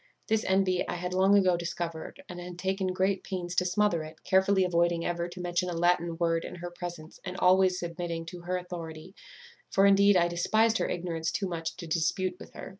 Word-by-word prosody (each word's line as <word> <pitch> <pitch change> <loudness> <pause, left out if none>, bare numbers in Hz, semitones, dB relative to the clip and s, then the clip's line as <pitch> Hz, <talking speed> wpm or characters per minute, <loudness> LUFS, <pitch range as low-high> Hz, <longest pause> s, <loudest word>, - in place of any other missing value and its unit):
This 220 0 +2
envy 190 -1 +2
I - - -3
had 180 +1 -4
long 190 +2 +5
ago 185 -3 +4
discovered, 170 - -5
and 180 -3 -8
had 175 0 -8
taken 190 +1 -1
great 190 +1 0
pains 180 -2 -4
to 180 - +1
smother 185 -2 +2
it, 155 0 -10
carefully 190 +1 +3
avoiding 170 -1 +1
ever 175 0 -2
to 180 +1 -10
mention 175 0 -1
a - - -3
Latin 170 0 +1
word 165 -1 +1
in - - -7
her 175 0 -7
presence, 175 -2 -8
and 180 +1 -6
always 185 0 +4
submitting 170 -1 -4
to 175 +1 -8
her 180 +1 -2
authority; 175 -1 -8 0.6
for 195 - +4
indeed 200 0 +6
I 175 -1 +4
despised 215 +6 +2
her - - 0
ignorance 165 -2 -2
too 195 - -2
much 165 -2 -4
to 175 - -7
dispute 175 +3 0
with - - -12
her. - - -7
180 Hz, 205 wpm, -29 LUFS, 170-190 Hz, 0.6 s, indeed